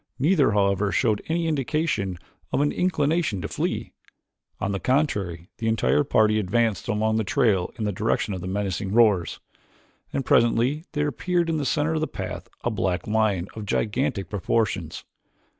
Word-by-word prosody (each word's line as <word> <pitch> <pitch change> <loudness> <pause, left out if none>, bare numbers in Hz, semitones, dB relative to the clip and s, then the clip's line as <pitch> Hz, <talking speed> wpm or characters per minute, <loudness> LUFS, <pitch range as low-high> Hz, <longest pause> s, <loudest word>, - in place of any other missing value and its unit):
Neither, 145 - +3
however, 100 0 +2
showed 110 -2 +1
any 165 +1 0
indication 140 - -1 0.3
of - - +1
an 145 0 +2
inclination 160 - 0
to - - -2
flee; - - -3 0.7
on 95 - -1
the 100 - -2
contrary 100 - -1
the 115 - -2
entire 115 +6 +2
party 110 -6 +3
advanced 110 0 0
along 110 +1 +1
the 110 - +1
trail 110 -8 +1
in 110 - -3
the 105 - 0
direction 105 +1 -1
of 95 - -5
the 90 - -5
menacing 95 0 -2
roars, 105 -7 +3 0.7
and 135 -2 -2
presently 120 +7 +2
there 150 0 0
appeared 170 +4 0
in 160 - 0
the 145 - -2
center 150 +3 +1
of 155 - -1
the 155 - 0
path 95 -1 -6 0.2
a 120 - 0
black 95 -4 -1
lion 105 -4 +1
of 110 -2 -7
gigantic 105 -1 -1
proportions. 95 -4 -1
110 Hz, 165 wpm, -25 LUFS, 100-145 Hz, 0.7 s, Neither